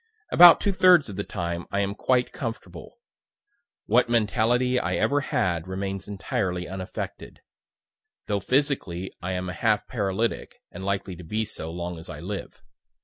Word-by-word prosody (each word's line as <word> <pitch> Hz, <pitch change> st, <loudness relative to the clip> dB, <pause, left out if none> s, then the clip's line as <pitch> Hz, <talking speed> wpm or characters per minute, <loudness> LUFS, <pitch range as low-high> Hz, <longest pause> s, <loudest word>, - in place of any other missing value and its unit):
About 175 Hz, -1 st, +9 dB
two 200 Hz, -, +1 dB
thirds 180 Hz, -, +5 dB
of 100 Hz, -, -7 dB
the 100 Hz, -, -3 dB
time 85 Hz, -1 st, -4 dB
I 100 Hz, -, 0 dB
am 100 Hz, 0 st, -1 dB
quite 125 Hz, +3 st, +1 dB
comfortable. 115 Hz, -2 st, -7 dB, 0.9 s
What 120 Hz, +3 st, +3 dB
mentality 120 Hz, +3 st, +2 dB
I -, -, -1 dB
ever 145 Hz, -, +2 dB
had 85 Hz, -, -1 dB
remains 95 Hz, 0 st, -4 dB
entirely 95 Hz, -3 st, -2 dB
unaffected; 95 Hz, 0 st, -7 dB, 0.8 s
though 100 Hz, -1 st, -1 dB
physically 125 Hz, -, -1 dB
I 95 Hz, +1 st, -3 dB
am 90 Hz, 0 st, -3 dB
a 90 Hz, -, -4 dB
half 110 Hz, -3 st, +1 dB
paralytic, 110 Hz, 0 st, -2 dB, 0.2 s
and 95 Hz, -, -8 dB
likely 100 Hz, -1 st, -2 dB
to 90 Hz, -, -10 dB
be 110 Hz, +7 st, -2 dB
so, 80 Hz, -6 st, -6 dB
long 85 Hz, 0 st, -5 dB
as 80 Hz, -, -12 dB
I 75 Hz, -, -7 dB
live. 95 Hz, +4 st, -7 dB
100 Hz, 155 wpm, -25 LUFS, 90-120 Hz, 0.9 s, About